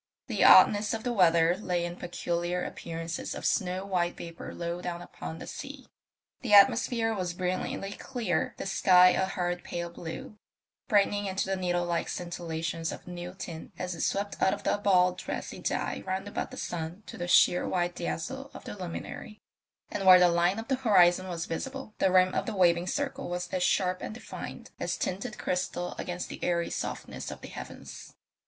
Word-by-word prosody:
The -, -, 0 dB
oddness 210 Hz, +1 st, +7 dB
of 220 Hz, -, -6 dB
the 245 Hz, -, -1 dB
weather 170 Hz, -4 st, +4 dB
lay 180 Hz, -4 st, -1 dB
in 175 Hz, 0 st, -5 dB
peculiar 175 Hz, 0 st, -2 dB
appearances 165 Hz, 0 st, -5 dB
of -, -, -6 dB
snow 185 Hz, +1 st, 0 dB
white 175 Hz, -3 st, 0 dB
vapour 170 Hz, -1 st, -8 dB
low 170 Hz, +1 st, -4 dB
down 175 Hz, -1 st, -4 dB
upon 165 Hz, -2 st, -8 dB
the -, -, -8 dB
sea. -, -, -8 dB, 0.5 s
The 220 Hz, -5 st, +4 dB
atmosphere 225 Hz, +3 st, +5 dB
was 180 Hz, -4 st, -3 dB
brilliantly 185 Hz, +2 st, -2 dB
clear, 215 Hz, -8 st, -2 dB
the -, -, -5 dB
sky 185 Hz, -1 st, +6 dB
a 190 Hz, +1 st, +1 dB
hard 175 Hz, -2 st, -2 dB
pale 170 Hz, 0 st, -4 dB
blue, 170 Hz, +5 st, -8 dB, 0.5 s
brightening 205 Hz, -1 st, +2 dB
into 190 Hz, 0 st, -1 dB
the 195 Hz, 0 st, -1 dB
needle 175 Hz, -1 st, 0 dB
like 170 Hz, -1 st, -1 dB
scintillations 165 Hz, -2 st, -3 dB
of -, -, -9 dB
new 175 Hz, +1 st, -7 dB
tin 165 Hz, +2 st, -7 dB
as 180 Hz, 0 st, -3 dB
it 165 Hz, -, -6 dB
swept 200 Hz, +1 st, -1 dB
out 190 Hz, +1 st, +4 dB
of -, -, -13 dB
a -, -, +1 dB
bald 180 Hz, -3 st, +3 dB
brassy -, -, -5 dB
dye -, -, -2 dB
round 190 Hz, +1 st, -2 dB
about 205 Hz, -, -3 dB
the -, -, -10 dB
sun 170 Hz, +4 st, -5 dB
to -, -, -9 dB
the 175 Hz, -, -4 dB
sheer 175 Hz, 0 st, +5 dB
white 175 Hz, -1 st, 0 dB
dazzle 265 Hz, +11 st, -4 dB
of -, -, -9 dB
the -, -, -7 dB
luminary; 190 Hz, +3 st, -7 dB, 0.5 s
and 195 Hz, -2 st, -2 dB
where 185 Hz, -1 st, +11 dB
the 180 Hz, -1 st, +6 dB
line 175 Hz, +3 st, +2 dB
of 225 Hz, -, -5 dB
the 265 Hz, -1 st, +1 dB
horizon 185 Hz, -6 st, +4 dB
was 170 Hz, -2 st, -3 dB
visible 265 Hz, +6 st, -5 dB
the 190 Hz, -, +3 dB
rim 185 Hz, 0 st, +5 dB
of -, -, -1 dB
the 220 Hz, -, -3 dB
waving 175 Hz, -1 st, +3 dB
circle 275 Hz, +2 st, -2 dB
was 180 Hz, 0 st, -3 dB
as 185 Hz, -, -2 dB
sharp 185 Hz, 0 st, +2 dB
and 215 Hz, -, -5 dB
defined 245 Hz, -, -8 dB
as -, -, -2 dB
tinted 215 Hz, +4 st, -3 dB
crystal 180 Hz, -1 st, -2 dB
against 180 Hz, -1 st, -4 dB
the -, -, -8 dB
airy 170 Hz, -1 st, 0 dB
softness -, -, -4 dB
of -, -, -8 dB
the -, -, -8 dB
heavens. -, -, -9 dB
180 Hz, 190 wpm, -29 LUFS, 175-200 Hz, 0.5 s, where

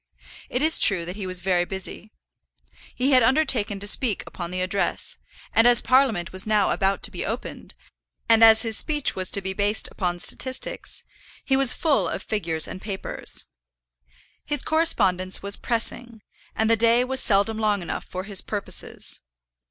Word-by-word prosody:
It 250 Hz, -, -2 dB
is 320 Hz, +1 st, +5 dB
true 185 Hz, -5 st, +4 dB
that 180 Hz, +2 st, -7 dB
he 200 Hz, -3 st, -6 dB
was 185 Hz, -1 st, -3 dB
very 180 Hz, -1 st, +1 dB
busy. 190 Hz, +3 st, -7 dB, 0.9 s
He 260 Hz, +3 st, 0 dB
had 255 Hz, -1 st, +5 dB
undertaken 230 Hz, -5 st, +2 dB
to 200 Hz, -, -2 dB
speak 215 Hz, 0 st, +2 dB
upon 175 Hz, -2 st, -7 dB
the 185 Hz, +1 st, -5 dB
address, 185 Hz, +2 st, -2 dB, 0.3 s
and 225 Hz, +1 st, +5 dB
as 240 Hz, -1 st, +7 dB
Parliament 255 Hz, -10 st, +1 dB
was 185 Hz, +2 st, +1 dB
now 210 Hz, -2 st, +2 dB
about 195 Hz, 0 st, -1 dB
to 215 Hz, -, -3 dB
be 180 Hz, -, -4 dB
opened, 225 Hz, +4 st, -6 dB, 0.5 s
and 225 Hz, 0 st, +5 dB
as 220 Hz, 0 st, +7 dB
his 225 Hz, -1 st, 0 dB
speech 300 Hz, -3 st, -1 dB
was 185 Hz, 0 st, +2 dB
to 200 Hz, -, -1 dB
be 190 Hz, 0 st, -3 dB
based 205 Hz, +2 st, +1 dB
upon 175 Hz, -2 st, -3 dB
statistics, 260 Hz, +8 st, -2 dB, 0.4 s
he 270 Hz, -, +1 dB
was 270 Hz, -2 st, +6 dB
full 310 Hz, -5 st, 0 dB
of -, -, -5 dB
figures 165 Hz, -7 st, -2 dB
and 185 Hz, -, -9 dB
papers. 195 Hz, -3 st, -5 dB, 1.0 s
His 295 Hz, -2 st, -2 dB
correspondence 195 Hz, -, +1 dB
was 200 Hz, +1 st, 0 dB
pressing, 230 Hz, -1 st, -3 dB, 0.3 s
and 220 Hz, -, 0 dB
the 230 Hz, -, +4 dB
day 230 Hz, +2 st, +4 dB
was 265 Hz, +1 st, -1 dB
seldom 215 Hz, +1 st, +2 dB
long 210 Hz, -3 st, 0 dB
enough -, -, -5 dB
for 185 Hz, 0 st, -7 dB
his 195 Hz, -1 st, -1 dB
purposes. 205 Hz, -2 st, -4 dB
215 Hz, 170 wpm, -23 LUFS, 190-245 Hz, 1.0 s, as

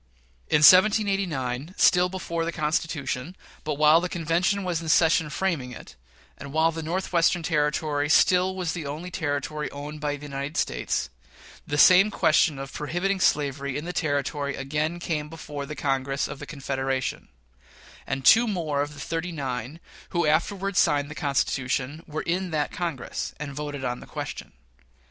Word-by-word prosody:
In 150 Hz, -, +3 dB
1787, 185 Hz, -, +4 dB
still 180 Hz, 0 st, +5 dB
before 170 Hz, -3 st, -3 dB
the 165 Hz, -, -2 dB
Constitution, 155 Hz, -1 st, -2 dB, 0.3 s
but 150 Hz, -1 st, -2 dB
while 155 Hz, +3 st, +5 dB
the 180 Hz, -, -2 dB
convention 175 Hz, +4 st, 0 dB
was 175 Hz, -3 st, -1 dB
in 165 Hz, -, -5 dB
session 160 Hz, -1 st, +4 dB
framing 150 Hz, -8 st, -2 dB
it, -, -, -12 dB, 0.4 s
and 140 Hz, -, -8 dB
while 160 Hz, +2 st, +3 dB
the 165 Hz, 0 st, -5 dB
Northwestern 175 Hz, 0 st, +1 dB
Territory 150 Hz, -2 st, 0 dB
still 185 Hz, +3 st, +4 dB
was 180 Hz, -3 st, -2 dB
the 165 Hz, -5 st, -5 dB
only 160 Hz, +6 st, -6 dB
Territory 150 Hz, -1 st, -2 dB
owned 150 Hz, +2 st, -8 dB
by 145 Hz, -1 st, -1 dB
the 145 Hz, +1 st, -10 dB
United 140 Hz, +2 st, -5 dB
States, -, -, -1 dB, 0.6 s
the 145 Hz, -, -2 dB
same 185 Hz, +7 st, +7 dB
question 155 Hz, -6 st, +3 dB
of 135 Hz, 0 st, -7 dB
prohibiting 180 Hz, +6 st, -1 dB
slavery 140 Hz, -4 st, 0 dB
in 150 Hz, -, -5 dB
the 180 Hz, -, -4 dB
Territory 145 Hz, -2 st, -1 dB
again 150 Hz, +5 st, -2 dB
came 155 Hz, -3 st, -3 dB
before 145 Hz, -3 st, -7 dB
the 150 Hz, -, -6 dB
Congress 135 Hz, -1 st, -1 dB
of 140 Hz, -, -8 dB
the -, -, -8 dB
Confederation; 135 Hz, -2 st, -3 dB, 0.8 s
and 135 Hz, -1 st, -3 dB
two 235 Hz, +2 st, +7 dB
more 160 Hz, -8 st, -1 dB
of 145 Hz, +1 st, -4 dB
the -, -, -11 dB
"thirty 165 Hz, +5 st, -3 dB
nine" 135 Hz, -1 st, -4 dB, 0.3 s
who 170 Hz, -2 st, 0 dB
afterward 190 Hz, +5 st, 0 dB
signed 145 Hz, -2 st, +2 dB
the -, -, -5 dB
Constitution 140 Hz, 0 st, -1 dB
were 155 Hz, 0 st, -4 dB
in 180 Hz, +2 st, -1 dB
that 150 Hz, -3 st, -1 dB
Congress, 165 Hz, -8 st, -4 dB
and 145 Hz, -2 st, -5 dB
voted 145 Hz, -1 st, -5 dB
on 125 Hz, 0 st, -2 dB
the -, -, -12 dB
question. -, -, -7 dB
150 Hz, 165 wpm, -25 LUFS, 140-175 Hz, 0.8 s, same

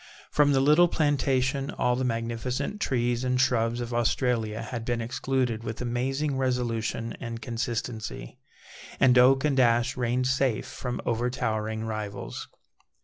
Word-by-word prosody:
From 145 Hz, -1 st, +4 dB
the 135 Hz, -, +4 dB
little 150 Hz, +5 st, +6 dB
plantation, 140 Hz, -3 st, +1 dB
all 125 Hz, 0 st, 0 dB
the 130 Hz, -, -1 dB
magnificent 125 Hz, -, -2 dB
trees 120 Hz, -1 st, 0 dB
and 125 Hz, 0 st, +1 dB
shrubs 120 Hz, -2 st, +2 dB
of 120 Hz, 0 st, -4 dB
Australia 115 Hz, -2 st, 0 dB
had 115 Hz, 0 st, -5 dB
been 120 Hz, 0 st, -1 dB
excluded 125 Hz, -1 st, -1 dB
with 110 Hz, -1 st, -5 dB
amazing 135 Hz, +4 st, -1 dB
resolution 115 Hz, -3 st, -1 dB
and 115 Hz, -2 st, -5 dB
consistency, 115 Hz, -, -4 dB, 0.6 s
and 125 Hz, -1 st, +5 dB
oak 135 Hz, +3 st, +5 dB
and 140 Hz, -3 st, +2 dB
ash 120 Hz, 0 st, +3 dB
reigned 125 Hz, 0 st, 0 dB
safe 130 Hz, -3 st, +1 dB
from 125 Hz, -1 st, -5 dB
overtowering 110 Hz, -2 st, -1 dB
rivals. 110 Hz, -2 st, -5 dB
125 Hz, 135 wpm, -27 LUFS, 115-130 Hz, 0.6 s, little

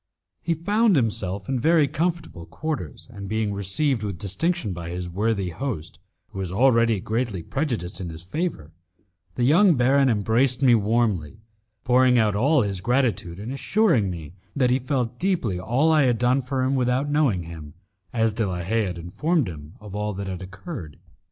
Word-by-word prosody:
He 165 Hz, 0 st, 0 dB
found 205 Hz, +5 st, +2 dB
himself 100 Hz, -6 st, -1 dB
in 130 Hz, -2 st, -1 dB
very 155 Hz, +2 st, +4 dB
comfortable 160 Hz, -, -3 dB
quarters, 155 Hz, -1 st, -5 dB
and 100 Hz, -3 st, -8 dB
being 110 Hz, -1 st, -1 dB
received 105 Hz, +7 st, 0 dB
with 100 Hz, -4 st, -4 dB
distinction 105 Hz, -, -1 dB
by 85 Hz, -1 st, -6 dB
his 90 Hz, +1 st, -4 dB
worthy 100 Hz, +1 st, -1 dB
host, 85 Hz, -, -5 dB, 0.3 s
who 95 Hz, -, -8 dB
was 95 Hz, -2 st, -3 dB
already 115 Hz, 0 st, +3 dB
greatly 110 Hz, -3 st, -2 dB
prejudiced 115 Hz, -, -3 dB
in 90 Hz, -, -4 dB
his 80 Hz, +1 st, -9 dB
favour, 90 Hz, -, -4 dB, 0.6 s
the 120 Hz, -, -1 dB
young 170 Hz, +7 st, +5 dB
baron 135 Hz, +2 st, +3 dB
embraced 120 Hz, +5 st, +1 dB
me 125 Hz, -2 st, +6 dB
warmly, 110 Hz, -6 st, +1 dB, 0.5 s
pouring 125 Hz, 0 st, +4 dB
out 110 Hz, -3 st, +2 dB
all 135 Hz, +5 st, +3 dB
his 100 Hz, -3 st, -3 dB
gratitude, 120 Hz, -7 st, 0 dB
and 105 Hz, +5 st, -6 dB
assuring 140 Hz, -, +2 dB
me 80 Hz, -3 st, -7 dB, 0.2 s
that 125 Hz, -3 st, +2 dB
he 130 Hz, -, +3 dB
felt 125 Hz, -2 st, -2 dB
deeply 170 Hz, -, 0 dB
all 130 Hz, -, +2 dB
I 155 Hz, -3 st, +4 dB
had 120 Hz, -2 st, +2 dB
done 125 Hz, +3 st, +2 dB
for 130 Hz, 0 st, -2 dB
him 130 Hz, +1 st, +1 dB
without 130 Hz, +1 st, +1 dB
knowing 135 Hz, -, +2 dB
him, 80 Hz, -2 st, -10 dB, 0.4 s
as 115 Hz, -1 st, +1 dB
De 110 Hz, -1 st, -1 dB
la 90 Hz, -1 st, -3 dB
Haye 110 Hz, +5 st, 0 dB
had 90 Hz, -2 st, -4 dB
informed 140 Hz, -, 0 dB
him 75 Hz, 0 st, -9 dB
of 105 Hz, -2 st, -11 dB
all 105 Hz, 0 st, -2 dB
that 100 Hz, +1 st, -4 dB
had 95 Hz, -1 st, -5 dB
occurred. 95 Hz, -, -8 dB
115 Hz, 175 wpm, -24 LUFS, 95-135 Hz, 0.6 s, me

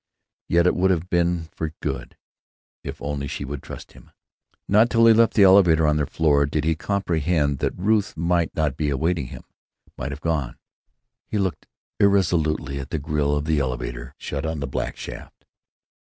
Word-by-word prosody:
Yet 85 Hz, +1 st, +3 dB
it 90 Hz, -, +4 dB
would 95 Hz, +2 st, +2 dB
have 90 Hz, 0 st, -1 dB
been 85 Hz, -2 st, +1 dB
for 80 Hz, -1 st, -4 dB
good, -, -, -5 dB, 0.7 s
if -, -, -7 dB
only 70 Hz, -1 st, -3 dB
she -, -, -5 dB
would 70 Hz, 0 st, -6 dB
trust -, -, -10 dB
him. -, -, -17 dB, 0.6 s
Not 110 Hz, +4 st, +4 dB
till 115 Hz, -1 st, +4 dB
he 115 Hz, -, +8 dB
left 115 Hz, 0 st, +3 dB
the 105 Hz, -, +6 dB
elevator, 90 Hz, -5 st, +6 dB
on 75 Hz, 0 st, +2 dB
their 75 Hz, -2 st, 0 dB
floor, 70 Hz, -3 st, +2 dB
did 75 Hz, +1 st, -1 dB
he 80 Hz, +1 st, +2 dB
comprehend 80 Hz, -5 st, 0 dB
that -, -, -2 dB
Ruth 105 Hz, +2 st, +1 dB
might 85 Hz, 0 st, +1 dB
not 75 Hz, -4 st, 0 dB
be 75 Hz, -2 st, 0 dB
awaiting 75 Hz, +1 st, -1 dB
him; -, -, -10 dB, 0.6 s
might 65 Hz, -, -3 dB
have 70 Hz, -, -6 dB
gone. 75 Hz, -7 st, -2 dB, 0.7 s
He 110 Hz, -, -2 dB
looked 95 Hz, -6 st, -2 dB, 0.3 s
irresolutely 80 Hz, -8 st, +2 dB
at 70 Hz, -, -7 dB
the -, -, -2 dB
grill 75 Hz, -1 st, 0 dB
of 75 Hz, 0 st, -2 dB
the 80 Hz, -1 st, +1 dB
elevator -, -, -3 dB
door, 65 Hz, -, -16 dB
shut 75 Hz, +1 st, -5 dB
on 80 Hz, -1 st, -3 dB
the 70 Hz, -, -2 dB
black 65 Hz, -, -4 dB
shaft. -, -, -10 dB
80 Hz, 185 wpm, -23 LUFS, 70-90 Hz, 0.7 s, he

